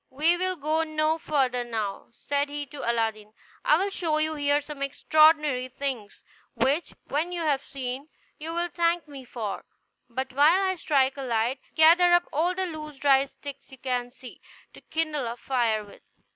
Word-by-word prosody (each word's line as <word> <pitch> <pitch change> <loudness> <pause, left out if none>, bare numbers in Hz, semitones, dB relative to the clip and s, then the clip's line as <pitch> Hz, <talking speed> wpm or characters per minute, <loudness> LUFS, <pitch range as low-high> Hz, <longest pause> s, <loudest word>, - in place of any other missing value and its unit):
"We 310 +6 +2
will 370 +1 -1
go 310 0 0
no 310 0 0
further 265 -6 0
now," 220 -4 -4
said 285 +4 -2
he 290 0 -4
to 275 -4 -3
Aladdin; 220 -2 -2 0.3
"I 305 - +5
will 395 +3 -1
show 325 -5 0
you 310 0 +1
here 290 -1 +2
some 290 -1 -9
extraordinary 300 -1 +3
things, 255 -6 -5 0.3
which, 290 +6 0
when 315 +5 -1
you 350 -1 -3
have 290 -4 +1
seen, 270 +2 -6 0.3
you 320 +2 -5
will 345 +1 -1
thank 340 -1 0
me 280 -3 -10
for; 220 -5 -5 0.5
but 260 +2 -4
while 300 +7 +5
I 380 -1 +1
strike 280 -6 +1
a - - -4
light, 240 +1 0 0.2
gather 345 +3 +6
up 350 0 +4
all 345 +5 +1
the 380 0 -1
loose 305 -4 -7
dry 275 -1 +4
sticks 280 0 -11
you 265 - -12
can 245 -1 -2
see, 250 0 -13 0.3
to - - -14
kindle 310 -5 -2
a 235 +1 -5
fire 230 -4 0
with." 200 - -16
285 Hz, 180 wpm, -26 LUFS, 255-315 Hz, 0.5 s, gather